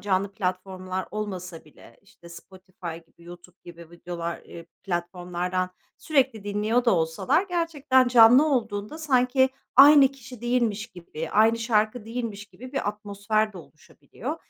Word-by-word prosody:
canlı 195 Hz, 0 st, -1 dB
platformlar 185 Hz, -1 st, -4 dB
olmasa 185 Hz, -5 st, -6 dB
bile, 150 Hz, -, -18 dB
işte, 175 Hz, -3 st, -18 dB
Spotify 185 Hz, -1 st, -10 dB
gibi, 170 Hz, -, -24 dB
YouTube 175 Hz, +1 st, -13 dB
gibi 170 Hz, -1 st, -13 dB
videolar 170 Hz, -1 st, -6 dB
eee, 170 Hz, -1 st, -12 dB, 0.2 s
platformlardan 180 Hz, 0 st, -3 dB, 0.3 s
sürekli 265 Hz, -8 st, 0 dB
dinliyor 210 Hz, +4 st, 0 dB
da 235 Hz, -, +4 dB
olsalar 170 Hz, -, +1 dB
gerçekten 300 Hz, -7 st, +1 dB
canlı 245 Hz, +4 st, +7 dB
olduğunda 225 Hz, -1 st, -2 dB
sanki 260 Hz, -3 st, +2 dB, 0.3 s
aynı 280 Hz, 0 st, +8 dB
kişi 255 Hz, -3 st, -13 dB
değilmiş 235 Hz, -3 st, -1 dB
gibi, 170 Hz, -6 st, -8 dB
aynı 225 Hz, +2 st, +3 dB
şarkı 220 Hz, 0 st, 0 dB
değilmiş 225 Hz, -3 st, -5 dB
gibi 255 Hz, +5 st, -13 dB
bir 270 Hz, -7 st, -2 dB
atmosfer 210 Hz, +1 st, -2 dB
de 190 Hz, -, -10 dB
oluşabiliyor. 155 Hz, -2 st, -9 dB
205 Hz, 130 wpm, -25 LUFS, 180-245 Hz, 0.3 s, aynı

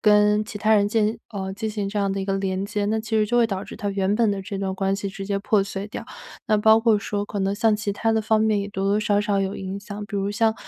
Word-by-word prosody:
跟 210 Hz, 0 st, +4 dB
其 210 Hz, -1 st, -7 dB
他 220 Hz, +1 st, +3 dB
人 205 Hz, -1 st, +4 dB
建 220 Hz, +1 st, +1 dB
呃， 190 Hz, -3 st, -4 dB
进 220 Hz, +1 st, -3 dB
行 210 Hz, -2 st, -3 dB
这 205 Hz, +1 st, -3 dB
样 195 Hz, -1 st, +1 dB
的 195 Hz, -, -2 dB
一 -, -, -2 dB
个 195 Hz, 0 st, -1 dB
连 195 Hz, 0 st, -1 dB
接。 205 Hz, 0 st, -2 dB
那 220 Hz, +1 st, 0 dB
其 220 Hz, +1 st, -10 dB
实 215 Hz, -, +4 dB
就 240 Hz, +3 st, 0 dB
会 235 Hz, -, +5 dB
导 195 Hz, -2 st, -4 dB
致 -, -, -9 dB
他 205 Hz, -, -3 dB
原 195 Hz, 0 st, 0 dB
本 225 Hz, -2 st, +3 dB
的 200 Hz, -1 st, -2 dB
这 195 Hz, +1 st, -5 dB
段 190 Hz, -1 st, -2 dB
关 195 Hz, 0 st, 0 dB
系 200 Hz, 0 st, -3 dB
直 195 Hz, 0 st, -7 dB
接 200 Hz, 0 st, 0 dB
破 210 Hz, -1 st, +2 dB
碎 195 Hz, +1 st, -5 dB
掉， -, -, -6 dB, 0.4 s
那 215 Hz, -1 st, +3 dB
包 220 Hz, +1 st, +6 dB
括 225 Hz, -2 st, +3 dB
说 205 Hz, 0 st, -3 dB
可 205 Hz, -, -5 dB
能 195 Hz, +1 st, 0 dB
像 220 Hz, 0 st, +3 dB
其 210 Hz, -1 st, -2 dB
他 225 Hz, +2 st, 0 dB
的 220 Hz, -, +2 dB
方 220 Hz, 0 st, +2 dB
面 215 Hz, -2 st, +2 dB
也 200 Hz, -, -4 dB
多 195 Hz, -1 st, -3 dB
多 205 Hz, +2 st, +2 dB
少 205 Hz, -1 st, +2 dB
少 205 Hz, -2 st, +1 dB
有 195 Hz, 0 st, -2 dB
影 195 Hz, +1 st, -5 dB
响， 205 Hz, 0 st, -7 dB
比 205 Hz, -, -9 dB
如 200 Hz, +1 st, -1 dB
像 220 Hz, +1 st, +2 dB
205 Hz, 325 characters per minute, -23 LUFS, 195-215 Hz, 0.4 s, 包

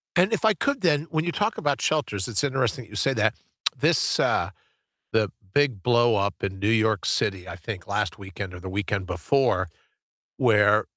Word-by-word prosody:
And 185 Hz, +5 st, +3 dB
if 220 Hz, -, -1 dB
I 220 Hz, -1 st, +5 dB
could 280 Hz, -, -1 dB
then, 155 Hz, -3 st, +2 dB
when 155 Hz, 0 st, 0 dB
you 170 Hz, -, -1 dB
talk 210 Hz, +4 st, -1 dB
about 145 Hz, -2 st, -1 dB
shelters, 120 Hz, -11 st, 0 dB
it's 115 Hz, +2 st, 0 dB
interesting 130 Hz, -3 st, 0 dB
that -, -, -21 dB
you 105 Hz, -, -11 dB
say 135 Hz, +6 st, +2 dB
that. 110 Hz, -3 st, +1 dB, 0.4 s
This, -, -, +4 dB
uh -, -, +1 dB, 0.6 s
the 110 Hz, -2 st, +2 dB, 0.2 s
big 130 Hz, -10 st, +1 dB
blow 120 Hz, -2 st, +3 dB
up 100 Hz, -1 st, -1 dB
in 95 Hz, -1 st, -3 dB
New 100 Hz, +2 st, 0 dB
York 110 Hz, -3 st, +2 dB
City, 95 Hz, -3 st, +1 dB
I -, -, -7 dB
think 90 Hz, 0 st, -7 dB
last 100 Hz, -3 st, -2 dB
weekend 95 Hz, -1 st, -7 dB
or 90 Hz, -, -9 dB
the 95 Hz, -, -6 dB
weekend 100 Hz, 0 st, -2 dB
before, 95 Hz, +1 st, +1 dB, 0.7 s
where 105 Hz, -3 st, +4 dB
110 Hz, 190 wpm, -25 LUFS, 100-140 Hz, 0.7 s, I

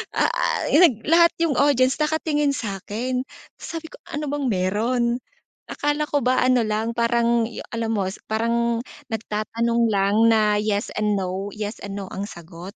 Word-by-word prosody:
ah, -, -, +1 dB
nag 295 Hz, -, +5 dB
lahat 335 Hz, +2 st, +5 dB
'yung 300 Hz, -5 st, +1 dB
audience 265 Hz, -1 st, +3 dB
nakatingin 300 Hz, -2 st, +1 dB
sa'kin, 225 Hz, +5 st, -3 dB, 0.4 s
sabi 325 Hz, -1 st, -6 dB
ko -, -, -12 dB
"ano 300 Hz, -1 st, -4 dB
bang 290 Hz, -2 st, -2 dB
meron?" 215 Hz, +5 st, 0 dB, 0.6 s
Akala 295 Hz, +1 st, -1 dB
ko 290 Hz, -1 st, 0 dB
ba 255 Hz, +1 st, +2 dB
ano 255 Hz, -2 st, +4 dB
lang, 220 Hz, +2 st, -1 dB
parang 235 Hz, 0 st, +2 dB
'yung -, -, -8 dB
alam 225 Hz, -1 st, -1 dB
mo, 200 Hz, -3 st, 0 dB, 0.2 s
parang 230 Hz, +1 st, +1 dB, 0.3 s
nagtatanong 230 Hz, +1 st, -1 dB
lang 200 Hz, 0 st, +2 dB
na 215 Hz, -2 st, +3 dB
yes 210 Hz, -1 st, -1 dB
and 210 Hz, -1 st, +1 dB
no 190 Hz, +2 st, -3 dB
yes 210 Hz, +1 st, -6 dB
and 200 Hz, 0 st, -5 dB
no 195 Hz, -, -5 dB
ang 195 Hz, -, -3 dB
sagot. 170 Hz, +3 st, -10 dB
230 Hz, 155 wpm, -23 LUFS, 210-265 Hz, 0.6 s, nag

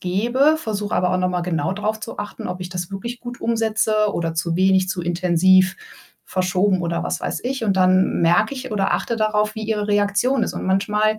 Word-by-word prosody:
gebe, 240 Hz, +12 st, +2 dB
versuche 210 Hz, -7 st, -3 dB
aber 180 Hz, 0 st, +1 dB
auch 185 Hz, -, +1 dB
noch 185 Hz, 0 st, +1 dB
mal 180 Hz, -1 st, -2 dB
genau 170 Hz, 0 st, -1 dB
drauf 215 Hz, +1 st, -2 dB
zu 225 Hz, -, -8 dB
achten, 205 Hz, 0 st, -6 dB
ob 180 Hz, 0 st, -5 dB
ich 180 Hz, -, -7 dB
das 175 Hz, 0 st, -5 dB
wirklich 235 Hz, +5 st, -6 dB
gut 245 Hz, 0 st, -8 dB
umsetze 220 Hz, -2 st, +1 dB
oder 165 Hz, -1 st, -2 dB
zu 165 Hz, 0 st, -1 dB
wenig, 190 Hz, 0 st, +3 dB
zu 185 Hz, -2 st, -3 dB
intensiv, 180 Hz, +2 st, +3 dB, 0.5 s
verschoben 185 Hz, +1 st, 0 dB
oder 170 Hz, 0 st, -2 dB
was -, -, -3 dB
weiß -, -, -3 dB
ich 260 Hz, 0 st, -2 dB
und 195 Hz, -3 st, +1 dB
dann 185 Hz, -1 st, +3 dB
merke 175 Hz, +9 st, +3 dB
ich 260 Hz, -3 st, -6 dB
oder 195 Hz, -2 st, +1 dB
achte 235 Hz, -, -2 dB
darauf, 215 Hz, -1 st, 0 dB
wie 220 Hz, -1 st, -5 dB
ihre 210 Hz, -1 st, -1 dB
Reaktion 205 Hz, +5 st, +1 dB
ist -, -, -2 dB
und -, -, -5 dB
manchmal 210 Hz, +3 st, +1 dB
200 Hz, 210 wpm, -21 LUFS, 180-220 Hz, 0.5 s, wenig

